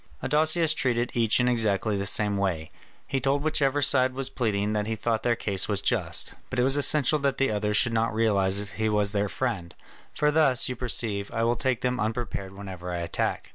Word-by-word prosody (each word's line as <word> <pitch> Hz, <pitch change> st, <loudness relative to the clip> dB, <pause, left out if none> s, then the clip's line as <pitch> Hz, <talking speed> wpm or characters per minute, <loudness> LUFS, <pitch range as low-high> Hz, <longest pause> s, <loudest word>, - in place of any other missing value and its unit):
Adousius 155 Hz, +3 st, +2 dB
treated 120 Hz, -4 st, -1 dB
each 115 Hz, -1 st, +2 dB
in 125 Hz, -, +2 dB
exactly 110 Hz, -3 st, 0 dB
the 100 Hz, 0 st, -1 dB
same 105 Hz, 0 st, +3 dB
way, 90 Hz, -5 st, -2 dB, 0.3 s
he 135 Hz, -, -2 dB
told 135 Hz, +2 st, 0 dB
whichever 145 Hz, -2 st, +1 dB
side 130 Hz, 0 st, +3 dB
was 135 Hz, -1 st, -4 dB
pleading 105 Hz, -4 st, -1 dB
that 105 Hz, 0 st, -2 dB
he 110 Hz, -, -2 dB
thought 110 Hz, 0 st, -1 dB
their 120 Hz, 0 st, +1 dB
case 100 Hz, -4 st, -1 dB
was 100 Hz, -2 st, -1 dB
just, 95 Hz, -6 st, 0 dB, 0.2 s
but 130 Hz, -, -5 dB
it 125 Hz, -, +3 dB
was 135 Hz, +2 st, +3 dB
essential 145 Hz, +1 st, +4 dB
that 140 Hz, -1 st, -1 dB
the 135 Hz, -4 st, +1 dB
others 105 Hz, 0 st, 0 dB
should 120 Hz, -1 st, +4 dB
not 115 Hz, 0 st, 0 dB
realise 100 Hz, -2 st, +1 dB
he 110 Hz, 0 st, -2 dB
was 105 Hz, -1 st, +1 dB
their 105 Hz, -1 st, -1 dB
friend, 100 Hz, -10 st, -4 dB, 0.4 s
"for 150 Hz, 0 st, +2 dB
thus, 145 Hz, -5 st, +2 dB
you 125 Hz, -, -4 dB
perceive, 110 Hz, -5 st, -3 dB
I 115 Hz, -, -1 dB
will 120 Hz, +1 st, +1 dB
take 130 Hz, -1 st, -1 dB
them 125 Hz, 0 st, -1 dB
unprepared 110 Hz, -3 st, -3 dB
whenever 95 Hz, -2 st, -8 dB
I 90 Hz, -, -3 dB
attack." 85 Hz, 0 st, -3 dB
115 Hz, 210 wpm, -26 LUFS, 100-130 Hz, 0.4 s, essential